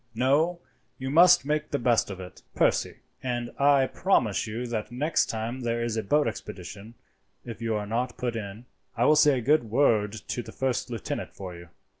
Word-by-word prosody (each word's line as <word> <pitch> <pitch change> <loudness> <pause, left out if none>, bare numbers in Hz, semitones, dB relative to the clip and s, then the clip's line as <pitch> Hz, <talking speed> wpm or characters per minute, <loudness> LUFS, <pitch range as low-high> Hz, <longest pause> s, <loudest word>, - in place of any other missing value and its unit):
No, 150 +8 +2 0.4
you 130 +1 -4
must 175 +4 +7
just - - -22
make 150 +1 -1
the 145 - 0
best 120 -5 +2
of 95 -2 -7
it, 90 -1 -10
Percy, - - +1 0.2
and 120 -2 -3
I 140 -1 +5
promise 120 - +1
you 115 +3 -4
that 110 -2 -4
next 145 +6 +1
time 115 +3 -4
there 115 -1 -1
is 115 -1 -2
a 110 - 0
boat 145 +8 +2
expedition, 105 +1 -7 0.5
if 115 -1 -8
you 115 -1 -1
are 105 -1 -2
not 120 +4 -2
put 120 -2 -2
in, 105 +1 -6 0.3
I - - +3
will 155 - +6
say 150 -3 +5
a - - -2
good 145 0 +3
word 110 -4 +2
to 110 +2 -5
the - - -10
first 130 -1 -2
lieutenant 115 -4 -5
for 90 -3 -7
you." 85 0 -12
120 Hz, 200 wpm, -27 LUFS, 110-140 Hz, 0.5 s, must